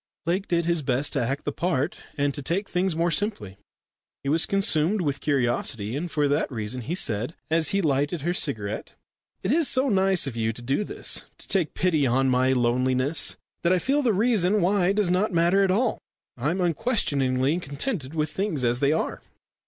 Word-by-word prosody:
Lake 185 +4 -1
did 170 -1 0
his 170 -1 +1
best 135 +1 0
to 140 - +1
act 135 +4 -2
the 145 - -1
part, 165 -1 -1 0.2
and 145 0 +1
to 145 - -5
take 180 +9 -2
things 180 -1 0
more 170 +1 +1
simply. 110 - -2 0.6
He 140 - -2
was 160 +3 +2
consumed 195 0 +1
with 145 -4 -1
curiosity, 120 -5 0
and 170 +5 -3
for 150 -2 +1
that 145 +1 0
reason 115 +1 -4
he 150 +9 -3
said, 120 - -1 0.2
as 160 -1 +2
he 195 -1 +1
lighted 145 +2 0
her 175 +4 -1
cigarette, 110 - -3 0.5
"It 190 - 0
is 320 0 +4
so 265 +1 +2
nice 190 -4 +3
of 135 -4 -4
you 115 -1 -1
to 120 - -11
do 135 +11 0
this - - -3
to - - -14
take 180 -6 0
pity 160 -5 +2
on 130 +2 +2
my 130 +1 +3
loneliness 130 +4 +1 0.2
that 170 - +2
I - - +3
feel 275 +10 +1
the 250 -5 +2
reason 210 -2 +2
why 190 0 +2
does 200 -3 +1
not 200 +4 +1
matter 175 +4 +3
at 195 - +2
all. 225 +6 +1 0.4
I 130 +4 -1
am 185 +3 -1
unquestioningly 150 - +1
contented 145 - -4
with 155 -1 0
things 185 -7 -1
as 120 0 +2
they 140 +1 +2
are." 160 - -2
155 Hz, 200 wpm, -25 LUFS, 130-185 Hz, 0.6 s, is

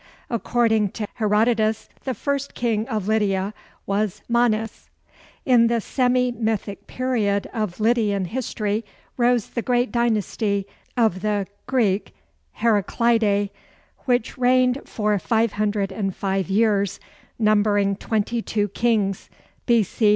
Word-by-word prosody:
According 225 -2 +1
to 210 -2 -4
Herodotus, 220 0 +1 0.2
the 260 -2 -2
first 280 -1 -2
king 225 -2 0
of 215 -6 -3
Lydia 205 -2 +1 0.3
was 200 -1 -1
Manes. 225 -2 0 0.6
In 240 -3 +5
the 235 0 +1
semi 250 +1 +1
mythic 220 -4 -3
period 220 -6 0
of 215 -6 -3
Lydian 215 -4 +2
history 215 0 -2 0.3
rose 240 -2 +2
the 235 - -2
great 245 +1 +1
dynasty 215 -3 0 0.3
of 220 -6 +2
the 205 -1 0 0.2
[Greek: 215 -7 0 0.5
Heraclidæ], 215 -1 +2 0.5
which 245 -2 0
reigned 255 +1 +3
for 210 -2 0
505 195 -1 -1
years, 200 -1 +2 0.4
numbering 205 -2 +2
twenty 220 +3 -1
two 205 -2 -1
kings 210 -2 0 0.4
B.C. 225 -2 +3
220 Hz, 105 wpm, -23 LUFS, 205-235 Hz, 0.6 s, In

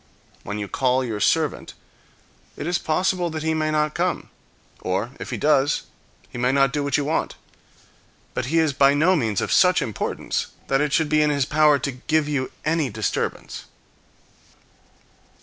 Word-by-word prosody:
When 105 - -5
you 105 -1 -4
call 130 +3 +1
your 110 -4 -4
servant, - - 0 0.8
it - - -5
is 175 +1 0
possible 180 +2 0
that 155 -1 -5
he 160 0 +1
may 155 -1 0
not 150 0 0
come; 175 0 -2 0.5
or, 95 +6 -2
if - - -7
he - - -3
does, 145 -1 +2 0.5
he 120 - -7
may 125 +1 +2
not 135 -1 +3
do 145 - -1
what 140 - +1
you 145 - -1
want. 155 +2 -1 1.0
But - - -3
he 165 +5 0
is 160 -3 +3
by 140 +1 +4
no 170 +6 +4
means 110 - 0
of - - -2
such 180 -1 +5
importance 110 -6 -3 0.2
that 135 +1 +2
it 150 -1 0
should 160 +2 +2
be 155 0 +3
in 150 - +3
his 140 -3 +1
power 150 0 +4
to 140 +1 -3
give 150 +4 0
you 140 -3 -2
any 155 -3 +1
disturbance. 110 -1 -3
145 Hz, 175 wpm, -23 LUFS, 130-155 Hz, 1.0 s, such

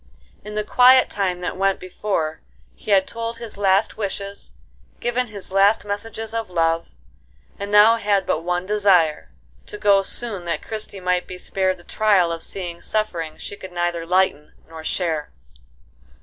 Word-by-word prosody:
In 210 +1 -8
the 210 - 0
quiet 255 +4 +6
time 185 -3 -1
that 180 - -3
went 195 0 +1
before, 180 -4 -3 0.3
he - - -12
had 195 -2 +5
told 230 0 -4
his 230 -2 -8
last 195 +1 +2
wishes, 200 -1 -5 0.5
given 245 +1 -1
his 205 -4 -8
last 200 +3 +4
messages 220 +2 -5
of 225 -3 -3
love, 165 -1 +1 0.7
and 200 0 -4
now 210 +2 +7
had 200 -3 +1
but - - 0
one 180 +1 -1
desire,—to 195 -1 0
go 205 -1 +4
soon 200 -2 -2
that 170 - -2
Christie 215 -2 -4
might 180 0 0
be 185 - -7
spared 185 0 -1
the 175 - -17
trial 195 -4 +2
of 165 -1 -4
seeing 175 -2 -6
suffering 170 -8 -2
she - - -7
could 190 -2 -10
neither 175 -1 -1
lighten 175 -4 +1
nor 160 -1 -10
share. 160 -3 -2
195 Hz, 160 wpm, -22 LUFS, 175-210 Hz, 0.7 s, now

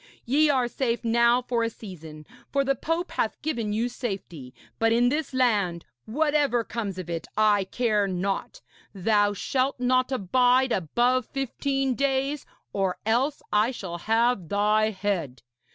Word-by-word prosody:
Ye 295 +5 +3
are 260 -4 +2
safe 240 -1 -2
now 235 +2 +3
for 240 -1 -1
a 230 - +1
season, 160 -9 -11 0.3
for 275 0 +2
the 275 0 +2
pope 330 +5 -2
hath 220 - -2
given 235 -9 -2
you 225 +3 0
safety, 195 - -6 0.3
but 225 0 +3
in 240 +1 +4
this 295 +2 -2
land 210 -10 +1 0.2
whatever 285 -1 +1
comes 210 -4 -4
of 185 -2 -6
it 165 -2 -4
I 210 -2 +3
care 210 -1 +1
not 195 - -3 0.3
thou 205 +1 +2
shalt 260 +6 -1
not 255 +1 +2
abide 250 +3 +3
above 240 +8 +1
fifteen 270 0 -1
days, 275 +2 -1 0.3
or 195 -2 0
else 255 +6 +1
I 210 +3 +4
shall 185 -9 -6
have 225 -2 +1
thy 210 +1 +2
head. 185 - -3
230 Hz, 150 wpm, -26 LUFS, 200-260 Hz, 0.3 s, in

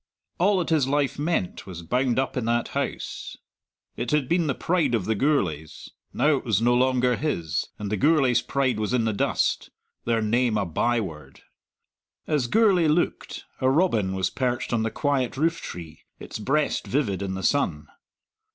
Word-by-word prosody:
All 195 +3 +3
that 175 -2 -1
his 150 -5 +3
life 140 -1 0
meant 150 - -2
was 85 -2 -8
bound 125 +6 0
up 135 0 0
in 125 -3 -1
that 120 0 0
house - - -4 0.6
it - - -3
had 150 -3 +1
been 170 0 +1
the 140 - 0
pride 160 -8 +1
of 105 -5 -1
the 110 - +1
Gourlays; 95 - -1 0.2
now 150 -1 +2
it - - -6
was 110 -5 +1
no 120 +2 +3
longer 125 0 +2
his, 85 - -2
and 105 -1 -5
the 105 - 0
Gourlays' 135 - +3
pride 130 -2 0
was 110 +3 -1
in 115 -3 +1
the 110 - 0
dust 100 - 0 0.4
their 115 -1 +1
name 115 +1 +1
a 100 - 0
by 115 +8 +1
word. 75 -9 -8 0.8
As 145 -6 0
Gourlay 195 - +4
looked, 155 +3 -1
a 130 - +2
robin 115 - +2
was 95 -1 0
perched 125 -2 -2
on 115 - +2
the 110 - 0
quiet 135 -1 -1
roof 165 +3 +1
tree, 80 -3 -8 0.2
its - - -7
breast 140 +7 0
vivid 110 -9 0
in 95 -1 -3
the 95 - -5
sun. 85 - +1
125 Hz, 180 wpm, -25 LUFS, 105-145 Hz, 0.8 s, Gourlay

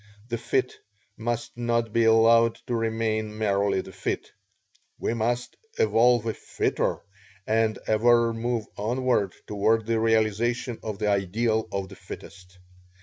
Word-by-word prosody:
The 120 -1 -2
fit 125 +2 -1 0.4
must 120 +1 -3
not 115 -2 -1
be 115 -1 +3
allowed 115 +1 +5
to 125 - -3
remain 110 -1 -1
merely 100 -2 +1
the - - -11
fit - - -4 0.7
we - - -1
must 120 +2 -1 0.2
evolve 115 +2 +4
a 110 - -1
fitter - - -1 0.4
and 110 0 +1
ever 115 +1 +3
move 115 -1 -2
onward 120 -2 0
toward 110 +2 +1
the 115 0 +1
realization 115 +2 +1
of 105 -2 -5
the 105 0 -1
ideal 110 +3 0
of 100 -1 -3
the 95 - -11
fittest. 95 -1 -11
115 Hz, 135 wpm, -26 LUFS, 105-115 Hz, 0.7 s, allowed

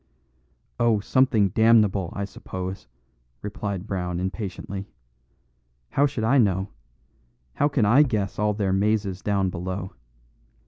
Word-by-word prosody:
"Oh, 115 -3 +3
something 110 -2 +3
damnable, 105 -4 +3
I 100 - -2
suppose," 95 -1 -7 0.6
replied 100 -2 -4
Brown 90 -4 -3
impatiently. 95 0 -5 1.0
"How 145 +1 +3
should 130 -5 -4
I 130 +5 +4
know? 95 -3 +1 0.8
How 145 - +2
can 135 -7 +1
I 120 +8 +6
guess 105 -10 0
all 105 -1 +1
their 100 -3 0
mazes 100 -1 0
down 100 -3 0
below? 95 +2 -5
100 Hz, 120 wpm, -25 LUFS, 95-110 Hz, 1.0 s, I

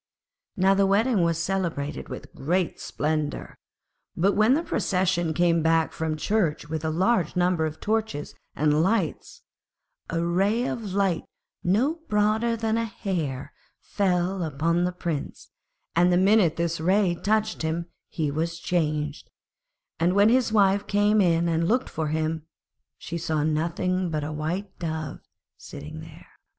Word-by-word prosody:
Now 190 +1 +4
the 195 0 +3
wedding 210 +2 +3
was 170 -1 +1
celebrated 170 -5 -2
with - - -8
great 175 +4 -1
splendour. 150 0 -2 0.6
But 190 +4 +3
when 220 +5 +4
the 325 - 0
procession 180 - 0
came 170 0 +2
back 160 0 +2
from 160 -1 -2
church 165 -5 0
with 160 0 -4
a 160 - 0
large 185 +1 +1
number 175 -3 +2
of 155 0 -8
torches 215 -9 -2 0.2
and 150 +1 +2
lights, 190 -2 -1 0.7
a 165 0 -1
ray 195 +7 +1
of 215 -7 -4
light 195 -5 +1 0.4
no 250 - +1
broader 215 +3 +2
than 225 0 0
a 230 - 0
hair 165 - -4 0.3
fell 185 -1 0
upon 165 +3 0
the 180 - 0
Prince, 170 -5 -5 0.4
and 175 +1 +4
the 175 - +4
minute 190 -3 +4
this 170 -1 -1
ray 185 +1 +3
touched 215 +4 0
him 160 +2 -1 0.2
he 155 -3 -2
was 165 +3 -2
changed; 150 -3 -2 0.7
and 175 +2 +2
when 205 +2 +5
his 250 -1 +3
wife 200 -1 +3
came 205 +1 +3
in 170 -2 +3
and 165 0 +1
looked 250 +5 +1
for 160 -1 -3
him, 160 +1 -2 0.5
she 170 0 -5
saw 155 -2 -1
nothing 170 +4 0
but 155 -2 -2
a 150 - -4
White 175 +6 -4
Dove 160 -3 -4 0.4
sitting - - -9
there. - - -12
175 Hz, 150 wpm, -25 LUFS, 160-200 Hz, 0.7 s, when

